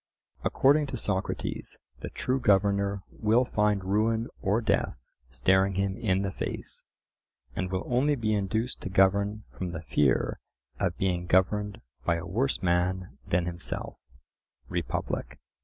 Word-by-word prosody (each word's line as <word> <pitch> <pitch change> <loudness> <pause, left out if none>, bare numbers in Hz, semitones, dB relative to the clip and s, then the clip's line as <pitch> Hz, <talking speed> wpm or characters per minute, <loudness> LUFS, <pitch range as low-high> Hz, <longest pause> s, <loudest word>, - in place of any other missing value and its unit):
According 145 +2 +4
to 130 - -4
Socrates 100 -3 -2 0.2
the - - -5
true 130 +1 -1
governor 100 -3 +2
will 115 +3 +3
find 105 -4 +1
ruin 110 +4 +1
or 100 +4 +2
death 100 - +1 0.3
staring 95 +9 +3
him 95 0 0
in 100 -5 +1
the 95 - -1
face, - - -4 0.7
and 95 -1 -2
will 95 0 -1
only 135 +4 +2
be 110 -4 0
induced 110 +4 -1
to - - -4
govern 100 +2 +3
from 90 -2 -4
the 80 0 -5
fear 75 -4 +2 0.4
of - - 0
being 90 -2 0
governed 105 +3 +2 0.2
by 85 - +2
a 85 - -4
worse 120 +6 0
man 90 +1 0
than 85 0 +2
himself 90 0 -4 0.7
(Republic). 85 -2 -3
100 Hz, 140 wpm, -28 LUFS, 95-110 Hz, 0.7 s, According